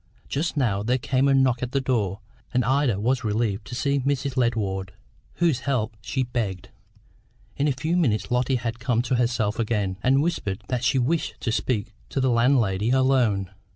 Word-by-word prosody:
Just 155 +3 -2
now 110 -8 +1
there 120 +5 +1
came 130 +2 +1
a 140 - +4
knock 130 -3 +3
at 125 -1 -4
the 135 - +2
door, 110 -7 -1 0.3
and 125 -2 +1
Ida 130 -5 +2
was 125 +4 0
relieved 105 -1 -1
to 125 - -6
see 140 +2 +1
Mrs. 135 0 -1
Ledward, 100 -6 -1 0.4
whose 165 -7 +2
help 120 -6 -1
she 130 +4 -1
begged. 110 -7 -3 0.9
In 145 - +1
a - - +3
few 155 +7 -1
minutes 120 - +1
Lotty 125 +2 +2
had 120 -1 -3
come 120 -1 +1
to 125 0 0
herself 120 -3 0
again, 105 -4 -1
and 135 +4 +3
whispered 105 - -2
that 125 -1 -1
she 135 +1 +2
wished 150 +6 0
to 115 - -1
speak 110 -3 -1 0.2
to - - -2
the 130 -1 +2
landlady 115 -4 +2
alone. 125 -7 +2
125 Hz, 185 wpm, -24 LUFS, 110-135 Hz, 0.9 s, a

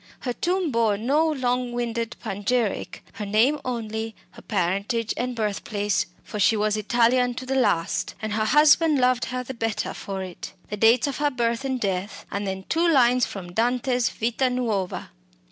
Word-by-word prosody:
Her 245 - -2
tomb 355 +2 0
bore 225 -4 +2
no 285 +9 +2
long 250 -4 -1
winded 235 -1 -2
panegyric. 205 +2 -2
Her 210 - -5
name 235 +9 +3
only, 225 -2 -4 0.2
her - - -14
parentage 200 +4 -1
and 250 0 -2
birthplace 210 -2 -1 0.2
for 210 - -6
she 215 +2 +4
was 210 0 +1
Italian 240 +3 +2
to 255 - -6
the 265 - -2
last, 175 -11 +1
and 215 -1 -3
her 215 0 +1
husband 300 +4 +5
loved 250 -1 +2
her 255 0 -3
the 265 - -6
better 225 -3 -2
for 195 -1 -5
it 185 0 -8 0.2
the - - -1
dates 225 +3 +5
of 280 -2 -3
her 295 0 +2
birth 235 -2 -1
and 260 -2 -1
death, 195 -1 -3
and 200 0 -3
then 190 0 -4
two 335 +1 +2
lines 250 -4 +4
from 175 -3 -8
Dante's 245 +2 +1
Vita 240 +3 0
Nuova. 220 - -2
235 Hz, 175 wpm, -24 LUFS, 210-255 Hz, 0.2 s, husband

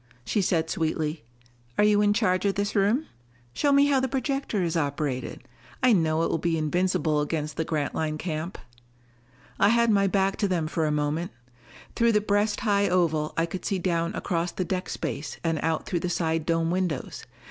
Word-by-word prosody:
She 200 - +1
said 165 -3 +1
sweetly, 155 -3 -2 0.5
"Are - - +4
you 210 0 +4
in 205 0 +4
charge 195 -4 +1
of 200 - +1
this 200 +1 -2
room? 210 +9 +2 0.5
Show 285 - +1
me 280 0 +5
how 280 -2 +3
the 265 - 0
projector 270 -6 -1
is 170 -1 -1
operated. 145 -4 -2 0.4
I 250 -2 +6
know 160 -3 +2
it - - 0
will 165 - 0
be 165 0 0
invincible 155 -1 +1
against 150 0 -3
the 160 - -1
Grantline 155 0 -2
camp." 160 +1 -4 1.0
I 200 - +5
had 235 0 +4
my 200 -1 +3
back 195 0 +1
to 205 - +1
them 175 -4 0
for 155 0 -1
a - - 0
moment. 150 +3 -1 0.7
Through 235 -1 +3
the 210 - +4
breast 205 +1 0
high 200 -2 +2
oval 160 -4 +1
I 165 - +2
could 180 +2 -6
see 195 - -1
down 170 -1 -1
across 170 -1 -1
the 185 - -3
deck 185 0 -3
space 150 -1 -4
and 165 -2 0
out 160 -1 -1
through 175 - -1
the 180 - -2
side 165 -2 -1
dome 165 0 +1
windows. 180 -6 -2
175 Hz, 190 wpm, -26 LUFS, 160-200 Hz, 1.0 s, I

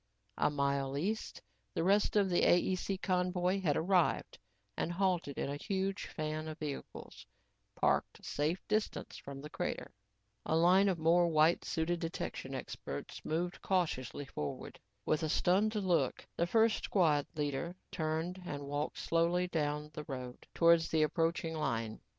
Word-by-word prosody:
A - - +4
mile 140 -1 0
east, 210 +9 -3 0.3
the - - +1
rest 200 +4 +3
of 205 -2 +4
the 175 -2 +2
AEC 185 +2 +2
convoy 180 0 +1
had 150 -6 +2
arrived 180 0 +1 0.4
and 170 - -1
halted 175 -6 0
in - - -1
a 140 +1 -3
huge 195 +4 -2
fan 155 0 -3
of 155 -1 -6
vehicles, 145 -3 -7 0.5
parked - - +1
a - - -25
safe 155 +5 -1
distance 215 0 -1
from 140 -1 -8
the 150 - -7
crater. - - -3 0.5
A 160 - 0
line 185 +4 +5
of 185 - 0
more 170 +2 +4
white 160 +1 +4
suited 170 +2 -1
detection 165 0 -4
experts - - -6
moved 175 +3 -2
cautiously 150 -8 -1
forward. 75 - -6 0.3
With 155 - +1
a 160 - -1
stunned 200 +8 +2
look, 185 -5 +1
the 170 - +1
first 225 +3 +3
squad 155 -7 +3
leader 150 +3 -2 0.2
turned 160 +3 -2
and 145 -5 -5
walked 145 +2 -3
slowly 170 +2 +2
down 150 -2 -2
the 150 -2 -6
road 125 -2 -7
towards 170 -1 +5
the 160 -1 +3
approaching 165 +1 0
line. 115 -8 -2
165 Hz, 150 wpm, -34 LUFS, 150-180 Hz, 0.5 s, line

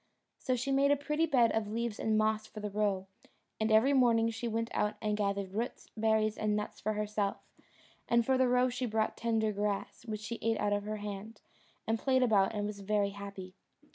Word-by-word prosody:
So 255 - 0
she 255 +3 -2
made 275 +1 +4
a 285 - +5
pretty 300 +3 0
bed 245 -6 +4
of 220 -1 -1
leaves 225 0 -3
and 220 -1 +1
moss 215 0 +1
for 215 - -9
the 210 -1 -4
roe; 200 -2 0 0.5
and 220 0 +1
every 225 +6 +5
morning 230 -3 +4
she 230 +1 -4
went 230 +1 -2
out 210 0 0
and 210 -1 -1
gathered 200 -2 -1
roots, 230 +4 -4
berries, 220 -1 +1
and 210 -1 +1
nuts 210 0 -4
for 215 +2 -1
herself; 210 -1 -1 0.7
and 235 -1 +3
for 265 - +3
the 260 0 +3
roe 250 +1 +3
she 250 0 -2
brought 220 -1 0
tender 220 -2 0
grass, 205 0 -3
which 215 -1 -4
he 235 - -4
ate 225 0 0
out 205 0 +1
of 205 0 -1
her 215 0 -3
hand, 210 +1 -7 0.4
and 225 0 0
played 260 0 +3
about 215 -3 +3
and 205 0 -1
was 210 -1 -5
very 200 0 0
happy. 200 -2 -8
215 Hz, 210 wpm, -32 LUFS, 210-235 Hz, 0.7 s, a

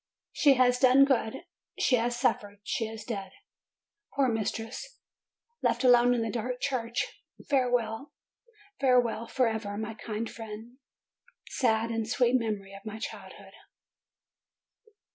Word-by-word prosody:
She 280 -2 +5
has 250 -1 +3
done 260 +1 +7
good, 235 -5 -1 0.3
she 250 - +3
has 240 +1 -1
suffered, 205 -5 -1
she 225 +1 -2
is 220 0 -8
dead! 195 -4 -5 0.8
Poor 275 -2 +3
mistress, 225 - -4 0.6
left - - +1
alone 245 -1 +6
in 230 - 0
that 225 - -3
dark 245 +1 -3
church! 240 -4 -2 0.3
Fare 260 -3 +2
well! 240 +3 -1 0.7
Farewell 245 -4 +2
forever, 220 -5 -1
my 220 +1 -4
kind 220 +1 -4
friend, 225 +2 -9 0.7
sad 230 -2 +1
and 225 -1 -2
sweet 245 +1 +2
memory 210 -5 -1
of 195 0 -11
my 220 0 -6
childhood! 220 - -8
230 Hz, 125 wpm, -29 LUFS, 220-250 Hz, 0.8 s, done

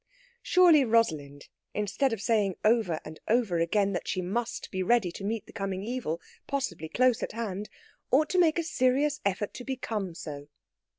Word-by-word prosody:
Surely 345 -6 +6
Rosalind, 155 - 0 0.3
instead 210 +6 0
of 225 - -2
saying 205 -5 +2
over 215 -8 +3
and 155 0 -9
over 220 -7 +2
again 200 +4 +1
that 175 - -3
she - - -1
must 225 +7 -3
be 185 - -2
ready 195 -2 +2
to 195 - -9
meet 215 +1 -2
the - - -15
coming 195 -3 -3
evil, 225 -8 -3 0.3
possibly 180 - -3
close 250 +5 +3
at - - -3
hand, 210 -3 -4 0.4
ought 300 +4 +3
to 370 - +2
make 330 -2 +4
a 335 - +1
serious 285 -1 +1
effort 200 +1 -2
to 250 - -7
become 220 -9 -3
so. 145 -4 -7
215 Hz, 175 wpm, -28 LUFS, 185-255 Hz, 0.4 s, Surely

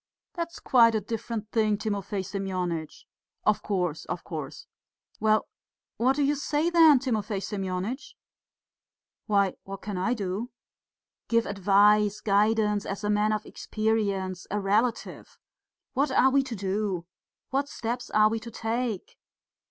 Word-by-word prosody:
"That's 335 -2 -5
quite 230 -3 +5
a - - +2
different 215 +1 -5
thing, 215 -2 +2
Timofey 200 -2 -3
Semyonitch." 180 -5 -4 0.4
"Of 215 - +3
course, 180 -6 -2
of 175 - -4
course." 155 -6 -7 0.5
"Well, 215 0 +2 0.5
what 255 +3 +3
do 290 - +1
you 285 +1 +3
say 295 +3 0
then, 325 -4 +7
Timofey 220 -6 -1
Semyonitch?" 195 +6 -4 1.1
"Why, 200 -3 +3
what 195 0 -8
can 200 -3 -4
I 195 +7 +1
do?" 205 +2 -3 0.8
"Give 230 -1 +2
advice, 205 +1 +3
guidance, 210 0 +2
as 200 +1 -5
a 210 - +1
man 210 +1 +2
of 215 -1 -1
experience, 200 -4 -2
a 210 - -1
relative! 215 +4 -1 0.6
What 275 +2 +1
are 265 0 +4
we 275 +1 +4
to 250 -3 -5
do? 195 -2 -2 0.5
What 275 +1 0
steps 240 +2 -4
are 215 0 +5
we 225 +1 -1
to 235 - -9
take? 225 -2 -3
210 Hz, 135 wpm, -27 LUFS, 195-235 Hz, 1.1 s, then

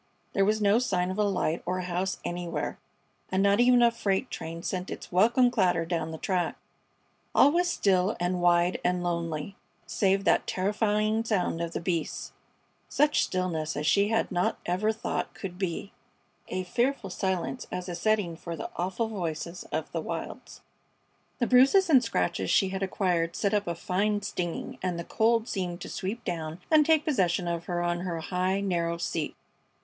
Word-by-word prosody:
There 195 - +3
was 215 +2 +2
no 205 +3 +5
sign 185 -7 0
of 190 - -4
a - - +4
light 180 -5 0
or 180 +1 -2
a 185 - -3
house 180 +2 -2
anywhere, 175 -3 -3 0.5
and 190 +1 +2
not 200 +1 +4
even 245 0 +6
a 235 - +6
freight 210 +1 -1
train 165 +1 -6
sent 185 0 -3
its - - -7
welcome 235 +7 +4
clatter 180 -7 +2
down 165 -2 -2
the 160 - -6
track. 180 0 -1 0.8
All 285 - +7
was 350 +2 +2
still 190 - +2
and 180 0 0
wide 175 +1 +3
and 180 0 +1
lonely, 170 0 -3 0.3
save 195 -1 +1
that - - +2
terrifying 210 +3 +1
sound 185 -6 0
of 170 0 -3
the - - -2
beasts; 170 -3 -2 0.6
such 295 +1 +3
stillness 170 -5 -2
as 150 - -2
she 200 +5 +4
had 225 0 0
not 180 -1 0
ever 185 +5 +1
thought 220 - -3
could 185 -2 -7
be 190 +1 -3 0.6
a 185 - -3
fearful 235 +2 -1
silence 190 +7 -2
as 180 0 -4
a 180 - -4
setting 190 -1 0
for 170 0 -6
the - - -6
awful 190 +6 -1
voices 170 -4 -4
of - - -3
the - - -2
wilds. - - -6 0.8
The 240 - +1
bruises 275 +10 +5
and 260 -4 +7
scratches 90 - -1
she 195 - +3
had 190 0 -4
acquired 180 -3 0
set 200 0 0
up 205 -2 +1
a 170 - -1
fine 205 +3 0
stinging, 175 -4 -4
and 180 -2 -1
the 170 - -4
cold 230 +4 +2
seemed 180 -3 -3
to - - -6
sweep 215 +6 -4
down 165 -2 -4
and 310 -1 +7
take 315 0 +3
possession 185 - +1
of 170 -1 -2
her 175 -1 -1
on 175 0 0
her 175 -2 -3
high, 185 +3 -1
narrow 170 -3 0
seat. 165 -2 -3
185 Hz, 180 wpm, -28 LUFS, 175-215 Hz, 0.8 s, All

